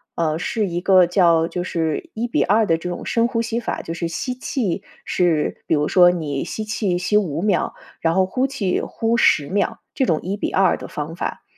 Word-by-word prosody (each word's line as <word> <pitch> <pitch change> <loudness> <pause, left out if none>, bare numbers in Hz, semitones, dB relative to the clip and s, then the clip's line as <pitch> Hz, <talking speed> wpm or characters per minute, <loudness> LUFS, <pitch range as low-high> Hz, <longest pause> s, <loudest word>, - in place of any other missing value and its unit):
呃， 160 -2 0
是 210 +4 -1
一 175 0 -3
个 185 -2 +5
叫 170 -2 +3
就 175 +1 -4
是 170 - -2
“1:2” 220 -2 +1
的 165 -2 +3
这 180 +2 -5
种 175 - -5
深 230 0 +2
呼 230 -2 0
吸 230 0 -2
法， - - -3
就 165 - -6
是 170 -1 -3
吸 250 +9 -3
气 245 -7 -2 0.2
是 165 -4 0
比 - - 0
如 150 0 +1
说 175 -1 +6
你 150 -6 -3
吸 215 - -5
气 205 -4 -1
吸 185 +4 -1
5 165 -7 +1
秒， 200 -2 +1 0.3
然 165 0 +2
后 190 +1 +3
呼 255 +8 0
气 225 -10 -1
呼 225 +1 -1
10 150 -10 +3
秒。 200 +6 -1 0.2
这 265 - +2
种 160 -7 +1
1:2 195 -1 +1
的 - - -8
方 150 +2 -5
法， - - -4
180 Hz, 195 characters per minute, -21 LUFS, 165-215 Hz, 0.3 s, 说